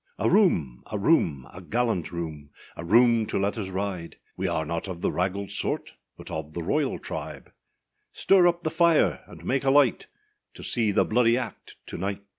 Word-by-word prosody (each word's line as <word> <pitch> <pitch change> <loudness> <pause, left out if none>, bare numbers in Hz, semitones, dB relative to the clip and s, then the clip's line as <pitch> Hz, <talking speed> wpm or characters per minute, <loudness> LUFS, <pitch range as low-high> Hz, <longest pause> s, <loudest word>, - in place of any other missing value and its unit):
A - - 0
room! 90 - +2
a 105 - -1
room! 85 - +2
a 90 - -10
gallant 110 -3 -1
room, 80 -4 -6 0.3
A 85 - -7
room 115 +4 +4
to - - -2
let 100 +1 0
us 105 -4 -4
ride! 95 -3 -4 0.2
We - - -2
are 80 - -1
not 85 +4 -4
of 90 -2 -7
the - - 0
raggald 95 +2 -2
sort, - - -2 0.2
But - - -9
of 75 -1 -5
the 85 - -4
royal 140 - 0
tribe: - - -7 0.6
Stir 185 -2 +4
up 175 0 0
the 155 - -1
fire, 170 -2 +3
and - - -13
make 135 +1 0
a 135 - +2
light, 135 -3 +3 0.5
To - - -10
see 110 -3 +2
the 100 - +2
bloody 115 +1 +3
act 125 -2 -7
to - - -7
night! 100 +2 -3
100 Hz, 195 wpm, -26 LUFS, 85-125 Hz, 0.6 s, room